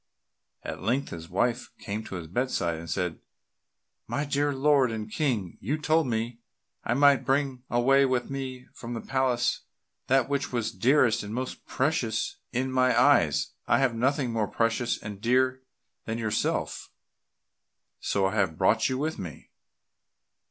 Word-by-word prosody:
At -, -, -6 dB
length 125 Hz, +8 st, 0 dB
his 85 Hz, 0 st, -8 dB
wife 120 Hz, +6 st, 0 dB
came 105 Hz, +2 st, -5 dB
to -, -, -7 dB
his 85 Hz, -2 st, -5 dB
bedside 90 Hz, -4 st, -1 dB
and 85 Hz, 0 st, -9 dB
said, 90 Hz, -3 st, -2 dB, 0.9 s
"My 145 Hz, -, -1 dB
dear 145 Hz, 0 st, +1 dB
lord 140 Hz, -1 st, +3 dB
and 110 Hz, -1 st, -5 dB
King, 115 Hz, -, -1 dB
you 140 Hz, +10 st, -1 dB
told 155 Hz, 0 st, +2 dB
me 115 Hz, 0 st, -2 dB, 0.4 s
I 120 Hz, -, 0 dB
might 140 Hz, 0 st, +5 dB
bring 135 Hz, -2 st, 0 dB
away 135 Hz, +3 st, +4 dB
with 125 Hz, -1 st, 0 dB
me 130 Hz, -2 st, -5 dB
from 120 Hz, 0 st, -7 dB
the 115 Hz, -, -4 dB
palace 130 Hz, -2 st, +1 dB, 0.5 s
that 130 Hz, -2 st, +3 dB
which 140 Hz, 0 st, -1 dB
was 120 Hz, -3 st, -1 dB
dearest 120 Hz, +3 st, +3 dB
and 105 Hz, +2 st, -6 dB
most 130 Hz, +1 st, -5 dB
precious 130 Hz, -5 st, -1 dB
in 130 Hz, +2 st, -1 dB
my 130 Hz, -2 st, +3 dB
eyes 120 Hz, -, +3 dB
I -, -, +4 dB
have 135 Hz, -3 st, +2 dB
nothing 130 Hz, +1 st, 0 dB
more 110 Hz, -2 st, 0 dB
precious 115 Hz, +2 st, 0 dB
and 105 Hz, -1 st, -8 dB
dear 130 Hz, +2 st, +2 dB, 0.4 s
than 110 Hz, 0 st, -3 dB
yourself, 110 Hz, -2 st, -1 dB, 1.1 s
so 100 Hz, -1 st, 0 dB
I 95 Hz, -, 0 dB
have 95 Hz, -7 st, 0 dB
brought 110 Hz, -, +3 dB
you 130 Hz, -, -1 dB
with 155 Hz, +3 st, -2 dB
me." 85 Hz, -6 st, -8 dB
125 Hz, 155 wpm, -27 LUFS, 110-135 Hz, 1.1 s, might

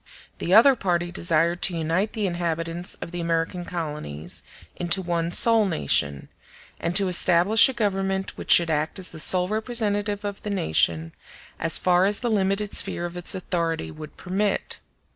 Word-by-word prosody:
The 175 Hz, -, -3 dB
other 235 Hz, +7 st, +7 dB
party 175 Hz, -5 st, -1 dB
desired 170 Hz, +1 st, +1 dB
to 175 Hz, -3 st, +1 dB
unite 165 Hz, +6 st, -1 dB
the 215 Hz, -3 st, -2 dB
inhabitants 170 Hz, 0 st, -3 dB
of -, -, -9 dB
the 175 Hz, -1 st, -5 dB
American 170 Hz, +1 st, -2 dB
colonies 145 Hz, -, -5 dB, 0.3 s
into 175 Hz, +2 st, +1 dB
one 170 Hz, -2 st, -2 dB
sole 225 Hz, +2 st, +5 dB
nation, 70 Hz, -, 0 dB, 0.5 s
and 170 Hz, +1 st, -3 dB
to 195 Hz, 0 st, +5 dB
establish 180 Hz, +6 st, +4 dB
a -, -, -4 dB
Government 195 Hz, -4 st, -2 dB
which -, -, -4 dB
should 170 Hz, -2 st, +6 dB
act 155 Hz, +1 st, -1 dB
as 185 Hz, -1 st, -2 dB
the 160 Hz, -, -10 dB
sole 180 Hz, +3 st, +2 dB
representative 210 Hz, -2 st, -2 dB
of 200 Hz, -1 st, -5 dB
the 210 Hz, -, -6 dB
nation, 80 Hz, -, +1 dB, 0.5 s
as 165 Hz, -, +1 dB
far 180 Hz, +1 st, +2 dB
as 205 Hz, 0 st, +1 dB
the 240 Hz, -2 st, -1 dB
limited 200 Hz, 0 st, 0 dB
sphere 175 Hz, -, -1 dB
of 175 Hz, 0 st, -7 dB
its 175 Hz, 0 st, -1 dB
authority 165 Hz, -, -3 dB
would 150 Hz, -, -11 dB
permit. 195 Hz, +2 st, -2 dB
175 Hz, 165 wpm, -24 LUFS, 165-200 Hz, 0.5 s, other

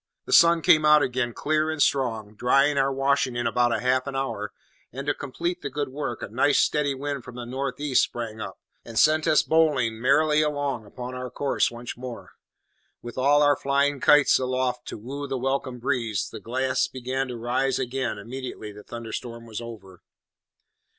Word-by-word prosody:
The -, -, -3 dB
sun 170 Hz, -1 st, +6 dB
came 155 Hz, -1 st, +5 dB
out 150 Hz, -1 st, +6 dB
again, 125 Hz, -1 st, -1 dB
clear 155 Hz, +5 st, 0 dB
and 155 Hz, -1 st, -3 dB
strong, 115 Hz, -7 st, 0 dB
drying 140 Hz, +6 st, +3 dB
our 135 Hz, 0 st, +2 dB
washing 135 Hz, -1 st, +1 dB
in 120 Hz, 0 st, -2 dB
about 120 Hz, +1 st, +2 dB
half 130 Hz, +1 st, +1 dB
an 140 Hz, -, -4 dB
hour, 135 Hz, 0 st, -3 dB, 0.4 s
and 135 Hz, +3 st, -6 dB
to 145 Hz, -, +1 dB
complete 170 Hz, +6 st, -4 dB
the 140 Hz, -, -4 dB
good 145 Hz, 0 st, -3 dB
work, 135 Hz, -3 st, -5 dB
a -, -, -4 dB
nice, 130 Hz, +6 st, +2 dB
steady 145 Hz, -2 st, +1 dB
wind 140 Hz, -1 st, -4 dB
from 125 Hz, -, -11 dB
the 120 Hz, -1 st, -6 dB
north 135 Hz, +2 st, -4 dB
east 145 Hz, -3 st, +2 dB
sprang 110 Hz, -2 st, -4 dB
up, -, -, -6 dB, 0.3 s
and 115 Hz, -1 st, -8 dB
sent 155 Hz, +3 st, +4 dB
us 155 Hz, -, +4 dB
bowling 135 Hz, -9 st, +2 dB
merrily 150 Hz, +4 st, +3 dB
along 145 Hz, -7 st, -2 dB
upon 125 Hz, +4 st, -7 dB
our 125 Hz, 0 st, -5 dB
course 135 Hz, +3 st, 0 dB
once 120 Hz, 0 st, -7 dB
more, 125 Hz, -1 st, -8 dB, 0.7 s
with 120 Hz, 0 st, -8 dB
all 145 Hz, +3 st, +4 dB
our 145 Hz, 0 st, +5 dB
flying 140 Hz, +1 st, +1 dB
kites 150 Hz, +2 st, +5 dB
aloft 130 Hz, -1 st, -2 dB
to -, -, -6 dB
woo 140 Hz, +6 st, -6 dB
the 135 Hz, -1 st, -2 dB
welcome 130 Hz, 0 st, -2 dB
breeze, 120 Hz, -5 st, -1 dB
the 110 Hz, -, -7 dB
glass 130 Hz, +4 st, 0 dB
beginning 130 Hz, +1 st, -3 dB
to 125 Hz, -2 st, -6 dB
rise 125 Hz, +3 st, 0 dB
again 130 Hz, -2 st, -2 dB
immediately 120 Hz, 0 st, -7 dB
the 105 Hz, 0 st, -12 dB
thunderstorm 115 Hz, +1 st, -7 dB
was 115 Hz, 0 st, -6 dB
over. 105 Hz, -6 st, -11 dB
130 Hz, 185 wpm, -25 LUFS, 120-145 Hz, 0.7 s, sun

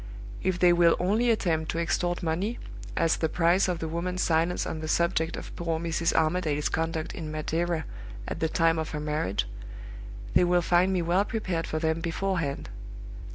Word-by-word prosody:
If 185 Hz, -1 st, 0 dB
they 180 Hz, -1 st, +5 dB
will 170 Hz, -1 st, +5 dB
only 215 Hz, +7 st, +2 dB
attempt 165 Hz, -8 st, +1 dB
to -, -, -2 dB
extort 175 Hz, +1 st, 0 dB
money, 180 Hz, +8 st, -1 dB, 0.4 s
as 165 Hz, 0 st, +3 dB
the 160 Hz, -, 0 dB
price 175 Hz, +4 st, +3 dB
of 180 Hz, -2 st, -1 dB
the 160 Hz, -, -4 dB
woman's 180 Hz, +3 st, -2 dB
silence 165 Hz, +2 st, +1 dB
on 160 Hz, -, -4 dB
the 155 Hz, -, -5 dB
subject 170 Hz, 0 st, +1 dB
of -, -, -8 dB
poor 165 Hz, -2 st, -2 dB
Mrs. 170 Hz, 0 st, 0 dB
Armadale's 155 Hz, -2 st, +1 dB
conduct 160 Hz, 0 st, -2 dB
in 155 Hz, -2 st, -6 dB
Madeira 160 Hz, +2 st, -1 dB, 0.4 s
at -, -, -4 dB
the 160 Hz, -, 0 dB
time 165 Hz, 0 st, +2 dB
of 160 Hz, -, -3 dB
her -, -, -3 dB
marriage, 150 Hz, -10 st, -1 dB, 0.9 s
they -, -, +5 dB
will 175 Hz, 0 st, +3 dB
find 175 Hz, +2 st, +3 dB
me 180 Hz, -2 st, +1 dB
well 175 Hz, +4 st, +2 dB
prepared 185 Hz, -7 st, -2 dB
for 155 Hz, -, -2 dB
them 160 Hz, 0 st, 0 dB
beforehand. 165 Hz, -3 st, -2 dB
170 Hz, 180 wpm, -27 LUFS, 160-180 Hz, 0.9 s, they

